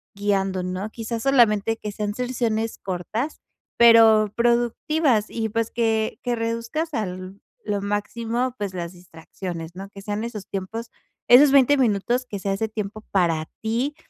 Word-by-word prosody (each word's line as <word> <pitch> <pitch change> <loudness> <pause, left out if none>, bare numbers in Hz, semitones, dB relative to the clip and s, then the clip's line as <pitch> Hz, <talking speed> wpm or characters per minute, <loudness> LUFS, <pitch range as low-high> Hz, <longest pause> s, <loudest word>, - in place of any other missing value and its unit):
guiando, 195 -2 0
¿no? 185 +3 -4
Quizás, 225 0 -4
solamente 225 -5 +3
que 210 - -5
sean 205 0 -3
sesiones 230 -3 -1
cortas, 205 - -4 0.4
pero 225 -3 +7
productivas 240 +1 +2
y 220 -1 -2
pues, 230 +1 -1
que 225 -2 0
que 245 -1 0
reduzcas 230 +8 -3
al 185 -1 -5 0.3
lo 205 -1 -1
máximo, 230 +5 -2
pues, 200 -2 -4
las 170 0 -5
distracciones, 175 -1 -8
¿no?, 195 +1 -8
que 200 -1 -11
sean 205 +2 -3
esos 220 -4 -6
tiempos, 220 +4 -5 0.4
esos 270 +3 +8
20 280 +1 +5
minutos 240 +1 +1
que 200 - -5
sea 195 +1 -1
ese 220 +3 -1
tiempo 215 0 -5
para 165 -4 +1
ti, 240 +7 -1
220 Hz, 150 wpm, -23 LUFS, 195-235 Hz, 0.4 s, esos